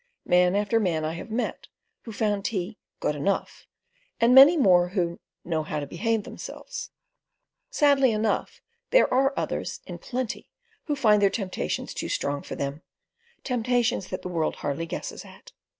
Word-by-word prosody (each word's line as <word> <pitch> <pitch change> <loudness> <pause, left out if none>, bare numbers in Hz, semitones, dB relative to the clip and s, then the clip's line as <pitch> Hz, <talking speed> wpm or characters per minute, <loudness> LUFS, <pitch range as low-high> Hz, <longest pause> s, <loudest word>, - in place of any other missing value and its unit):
Man 180 +1 +4
after 210 +3 +2
man 165 -7 0
I 155 - -2
have 170 - -8
met 235 +3 -3 0.4
who 230 - -7
found 205 -2 -1
tea 200 +1 -3 0.2
"good 150 - -1
enough," 190 +7 -2 0.5
and 235 +2 +5
many 275 +6 +9
more 180 - +5
who 175 -2 -2 0.3
"know 165 -2 0
how 155 0 -3
to 145 - -4
behave 220 - -1
themselves." - - -8 0.8
Sadly 280 - +4
enough, 215 0 -1 0.3
there - - +4
are 270 +2 +3
others - - -3
in - - -8
plenty 250 -3 -4 0.4
who 295 - -1
find 215 -6 +4
their 200 - +5
temptations 195 -2 -3
too - - -4
strong 140 0 -1
for - - -7
them—temptations 245 - -3
that - - -5
the - - -4
world 165 -3 -1
hardly 145 +4 -3
guesses - - -6
at. - - -15
210 Hz, 155 wpm, -26 LUFS, 175-250 Hz, 0.8 s, many